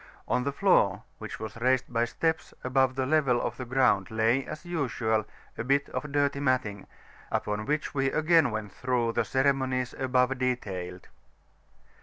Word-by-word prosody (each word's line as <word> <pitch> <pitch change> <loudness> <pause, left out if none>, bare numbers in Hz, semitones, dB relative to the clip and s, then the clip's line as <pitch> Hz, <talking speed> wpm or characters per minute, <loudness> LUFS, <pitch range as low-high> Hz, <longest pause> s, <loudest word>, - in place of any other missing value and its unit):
On 125 - +1
the 140 - 0
floor, 140 - +3 0.2
which - - -7
was 110 +1 -6
raised 130 0 +1
by 115 0 +2
steps 160 +6 -2
above 130 0 +2
the 130 -1 0
level 135 -4 +3
of - - -3
the 125 - -5
ground, 120 -7 +2
lay, 115 +4 +2
as 155 - -7
usual, 115 -10 0 0.3
a - - -1
bit 140 +3 +1
of 150 - -4
dirty 145 -1 +1
matting, 130 -8 -1 0.4
upon 105 +1 -2
which 150 +1 -1
we 135 -1 +1
again 160 -2 +4
went 110 -2 -4
through, 125 -1 0
the - - +1
ceremonies 130 -2 0
above 130 0 +1
detailed. 95 -8 -3
130 Hz, 160 wpm, -28 LUFS, 115-140 Hz, 0.4 s, again